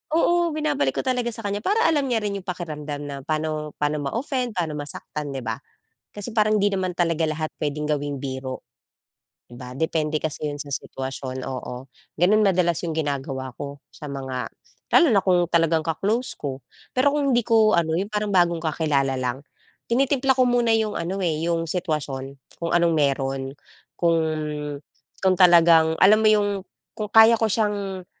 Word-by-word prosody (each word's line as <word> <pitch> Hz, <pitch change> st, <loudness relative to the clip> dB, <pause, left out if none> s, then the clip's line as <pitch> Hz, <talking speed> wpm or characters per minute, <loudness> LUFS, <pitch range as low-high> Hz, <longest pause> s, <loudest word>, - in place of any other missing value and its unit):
oo 345 Hz, 0 st, +3 dB
binabalik 300 Hz, -2 st, 0 dB
ko -, -, 0 dB
talaga 250 Hz, -2 st, 0 dB
sa 225 Hz, -2 st, -6 dB
kanya 200 Hz, 0 st, -1 dB
para 435 Hz, -, +1 dB
alam 290 Hz, -4 st, +2 dB
niya 225 Hz, -4 st, 0 dB
rin 200 Hz, -1 st, -2 dB
yung 185 Hz, -, -15 dB
pakiramdam 150 Hz, -5 st, -5 dB
na 140 Hz, -1 st, -5 dB
pa'no 155 Hz, 0 st, -3 dB
pa'no 150 Hz, 0 st, 0 dB
ma-offend, 245 Hz, -, -2 dB
pa'no 160 Hz, -3 st, -1 dB
masaktan, 145 Hz, 0 st, -6 dB
di 130 Hz, -, -4 dB
ba? 110 Hz, 0 st, -3 dB, 0.5 s
Kasi 210 Hz, +3 st, -6 dB
parang 215 Hz, -1 st, +3 dB
'di 200 Hz, 0 st, +2 dB
naman 185 Hz, -1 st, -1 dB
talaga 170 Hz, -2 st, 0 dB
lahat 155 Hz, 0 st, -1 dB, 0.2 s
pwedeng 150 Hz, +1 st, -2 dB
gawing 145 Hz, -2 st, -2 dB
biro, 130 Hz, -1 st, -6 dB, 0.8 s
di 120 Hz, -, -11 dB
ba? 125 Hz, -1 st, -9 dB
Depende 155 Hz, 0 st, -1 dB
kasi 155 Hz, -1 st, -3 dB
'yon 145 Hz, -1 st, -4 dB
sa 145 Hz, -, -12 dB
sitwasyon. 130 Hz, -1 st, -4 dB
Oo, 130 Hz, 0 st, -6 dB, 0.2 s
gano'n 185 Hz, +6 st, +3 dB
madalas 175 Hz, -3 st, +2 dB
yung 160 Hz, -, -3 dB
ginagawa 135 Hz, -3 st, -3 dB
ko 140 Hz, 0 st, -7 dB
sa 150 Hz, -, -10 dB
mga 130 Hz, -2 st, -4 dB, 0.5 s
lalo 340 Hz, -, +7 dB
na 205 Hz, -, +4 dB
kung 180 Hz, -2 st, +3 dB
talagang 165 Hz, -1 st, +2 dB
ka-close 205 Hz, +10 st, -1 dB
ko. 135 Hz, -2 st, -5 dB, 0.3 s
Pero 265 Hz, +3 st, +3 dB
kung 280 Hz, -3 st, +1 dB
hindi 240 Hz, -, +3 dB
ko 220 Hz, -1 st, +4 dB
ano, 165 Hz, -1 st, +1 dB
yung 195 Hz, -, -1 dB
parang 210 Hz, -1 st, -1 dB
bagong 170 Hz, -3 st, +2 dB
kakilala 145 Hz, -4 st, 0 dB
lang, 130 Hz, +2 st, -3 dB, 0.5 s
tinitimpla 265 Hz, +1 st, +2 dB
ko 255 Hz, -, +5 dB
muna 240 Hz, -1 st, +2 dB
yung 220 Hz, -1 st, +1 dB
ano 185 Hz, +4 st, -3 dB
eh, 170 Hz, -5 st, 0 dB, 0.2 s
yung 165 Hz, 0 st, 0 dB
sitwasyon, 155 Hz, -6 st, -2 dB, 0.4 s
kung 170 Hz, -, -1 dB
anong 170 Hz, -1 st, +3 dB
meron. 135 Hz, -2 st, 0 dB, 0.6 s
Kung 170 Hz, -1 st, +3 dB, 1.0 s
kung 190 Hz, -1 st, +3 dB
talagang 170 Hz, -3 st, +5 dB
alam 210 Hz, +3 st, +6 dB
mo 215 Hz, -, +5 dB
yung, 205 Hz, -1 st, +3 dB, 0.5 s
kung 210 Hz, -1 st, -5 dB
kaya 225 Hz, +1 st, +8 dB
ko 225 Hz, -1 st, +1 dB
siyang 200 Hz, -3 st, -1 dB
170 Hz, 170 wpm, -23 LUFS, 145-215 Hz, 1.0 s, kaya